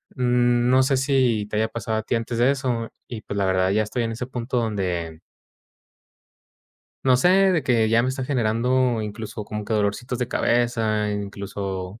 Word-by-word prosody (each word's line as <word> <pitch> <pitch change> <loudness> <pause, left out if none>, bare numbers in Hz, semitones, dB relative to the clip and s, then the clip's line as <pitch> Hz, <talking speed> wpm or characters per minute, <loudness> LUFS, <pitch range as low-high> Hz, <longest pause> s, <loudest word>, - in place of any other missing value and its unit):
Mm, 120 -1 +2
no 130 +1 +5
sé 130 +1 +2
si 130 -5 +1
te 105 - -3
haya 110 +1 +2
pasado 110 -1 -3
a 110 - -2
ti 120 - -1
antes 115 0 -3
de 125 +3 +4
eso, 125 -4 -2 0.2
y 115 -3 -7
pues 100 - -7
la 100 -1 +1
verdad, 95 0 +2
ya 110 +1 +2
estoy 115 +3 -2
en 115 0 -2
ese 120 +3 -4
punto 125 0 -3
donde 90 -7 -2 1.9
No 130 -1 +5
sé 155 +8 +3 0.2
de 160 -5 +1
que 115 -3 +2
ya 115 +1 +3
me 130 - 0
está 130 0 -3
generando, 125 -1 +1
incluso, 105 0 -6
como 105 0 -5
que 110 - -4
dolorcitos 110 +4 -1
de 125 - -1
cabeza, 115 -3 +1
incluso, 100 -1 -5
115 Hz, 185 wpm, -23 LUFS, 105-125 Hz, 1.9 s, no